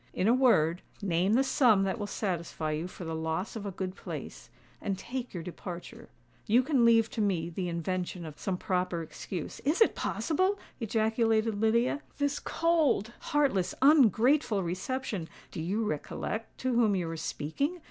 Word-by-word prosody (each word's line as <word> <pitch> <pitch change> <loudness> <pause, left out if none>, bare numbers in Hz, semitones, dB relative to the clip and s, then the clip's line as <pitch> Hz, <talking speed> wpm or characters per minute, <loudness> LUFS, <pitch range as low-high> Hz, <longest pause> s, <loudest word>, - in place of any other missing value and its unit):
In 185 - +1
a 230 - +6
word, 180 -10 +4 0.2
name 185 +2 +2
the 260 +4 +4
sum 240 -7 +4
that 195 +3 -1
will 205 - -3
satisfy 170 -6 -2
you 155 +3 -2
for 180 -1 -9
the 165 - -3
loss 160 +6 -2
of 210 -2 -5
a - - -3
good 185 0 -4
place—and 195 -2 -7
take 245 +5 -5
your 175 -3 -5
departure. 175 0 -8 0.4
You 235 +4 +5
can 265 -4 +3
leave 230 -1 +5
to 220 - -2
me 175 -5 0
the 180 +1 -3
invention 175 +1 -3
of 155 -2 -9
some 190 -2 -2
proper 180 -2 -1
excuse——" 165 +1 -6
"Is 300 +5 +1
it 450 - +5
possible?" 370 +5 0 0.2
ejaculated 220 -1 +1
Lydia; 235 +6 +2 0.2
"this 285 -1 0
cold—heartless—ungrateful 270 - +3
reception——" 185 0 -3 0.2
"Do 160 - -5
you 200 +7 -1
recollect 215 +6 -4
to 255 -1 0
whom 225 -4 +3
you 175 -3 -1
are 165 - -4
speaking?" 160 - -2
205 Hz, 155 wpm, -30 LUFS, 175-245 Hz, 0.4 s, a